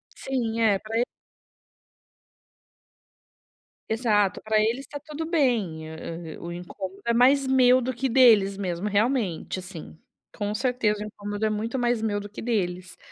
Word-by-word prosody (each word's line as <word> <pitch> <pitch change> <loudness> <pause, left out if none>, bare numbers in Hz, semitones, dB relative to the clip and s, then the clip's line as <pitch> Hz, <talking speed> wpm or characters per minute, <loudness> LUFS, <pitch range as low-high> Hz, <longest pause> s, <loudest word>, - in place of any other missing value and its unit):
Sim, 235 -4 -2
é 215 -3 +4
pra 220 +1 -4
e 240 - +4 2.9
Exato, 215 -4 +1
pra 215 0 +1
eles 230 +6 0
tá 290 - -7
tudo 305 +2 -6
bem. 220 - +1 0.5
E, - - -10
o 170 - -6
incômodo 185 +2 -7
é 235 - +2
mais 265 +3 +5
meu 255 -1 +5
do 255 +1 -2
que 265 +3 -1
deles 225 -6 +5
mesmo, 185 0 -3
realmente, 205 -5 0
assim. 180 -4 -9 0.4
Com 205 0 -2
certeza 225 -4 0
o - - -5
incômodo 205 0 -4
é - - +2
muito 220 +4 -2
mais 240 -2 +1
meu 205 -2 0
do 205 0 -8
que 210 - -9
deles, 185 -6 -2
220 Hz, 150 wpm, -25 LUFS, 200-250 Hz, 2.9 s, mais